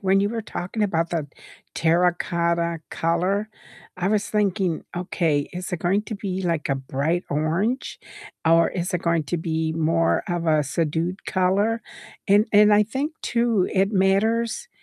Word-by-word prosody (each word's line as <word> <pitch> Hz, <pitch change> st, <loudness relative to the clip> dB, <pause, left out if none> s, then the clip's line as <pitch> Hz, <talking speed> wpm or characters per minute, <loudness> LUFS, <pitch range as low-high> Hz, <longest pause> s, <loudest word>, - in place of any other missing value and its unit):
when 195 Hz, 0 st, +3 dB
you 200 Hz, -, +1 dB
were 230 Hz, -1 st, -3 dB
talking 210 Hz, +1 st, -4 dB
about 165 Hz, -4 st, 0 dB
the 160 Hz, -4 st, -2 dB, 0.5 s
terracotta 170 Hz, 0 st, +1 dB
color, 185 Hz, +6 st, 0 dB, 0.5 s
I 185 Hz, +2 st, 0 dB
was 205 Hz, -1 st, +1 dB
thinking, 195 Hz, -5 st, 0 dB
"Okay, 165 Hz, -5 st, 0 dB
is 180 Hz, +1 st, -6 dB
it 180 Hz, -, -1 dB
going 195 Hz, +4 st, +1 dB
to 215 Hz, -, -6 dB
be, 190 Hz, -2 st, -4 dB
like, 165 Hz, -4 st, -1 dB
a 135 Hz, -, +2 dB
bright 140 Hz, +6 st, -2 dB
orange? 170 Hz, -, -1 dB, 0.5 s
Or 165 Hz, 0 st, +5 dB
is 180 Hz, 0 st, -3 dB
it 175 Hz, -, -1 dB
going 170 Hz, -2 st, +1 dB
to 155 Hz, +6 st, -2 dB
be 160 Hz, -1 st, -1 dB
more 165 Hz, +1 st, +1 dB
of 175 Hz, -1 st, -2 dB
a 155 Hz, -1 st, +3 dB
subdued 165 Hz, +5 st, -2 dB
color?" 200 Hz, +5 st, +1 dB, 0.5 s
And 205 Hz, +3 st, +5 dB
and 210 Hz, 0 st, +6 dB
I 210 Hz, 0 st, +6 dB
think 270 Hz, +8 st, -3 dB
too, 235 Hz, -5 st, +1 dB
it 195 Hz, +1 st, +2 dB
matters 220 Hz, -, +1 dB
180 Hz, 160 wpm, -23 LUFS, 165-205 Hz, 0.5 s, and